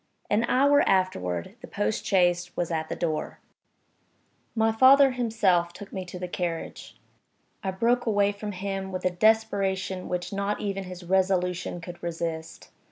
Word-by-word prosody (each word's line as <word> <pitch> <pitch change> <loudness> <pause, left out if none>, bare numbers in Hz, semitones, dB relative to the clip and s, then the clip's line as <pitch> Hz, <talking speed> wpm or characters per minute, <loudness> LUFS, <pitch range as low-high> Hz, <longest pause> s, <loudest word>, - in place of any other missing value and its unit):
An 215 +3 +3
hour 285 +2 +4
afterward 90 - 0
the - - -9
post 105 +1 -2
chaise 175 -2 +2
was 175 -1 -1
at 160 -1 -2
the - - -3
door. 160 -3 -3 1.2
My 225 0 +3
father 265 +4 +6
himself 210 -8 +1
took 205 +3 -11
me 190 -1 -4
to 180 0 -8
the 180 0 -4
carriage. 175 -2 -5 0.7
I 190 - -1
broke 235 +6 +1
away 205 -2 +3
from 205 0 -6
him, 195 0 -4
with 185 0 -5
a 185 - +3
desperation 195 -2 +1
which 180 +2 -3
not 200 +1 -1
even 195 -2 -3
his 180 0 -9
resolution 180 -1 0
could 175 0 -9
resist. 165 -1 -5
190 Hz, 155 wpm, -26 LUFS, 175-205 Hz, 1.2 s, father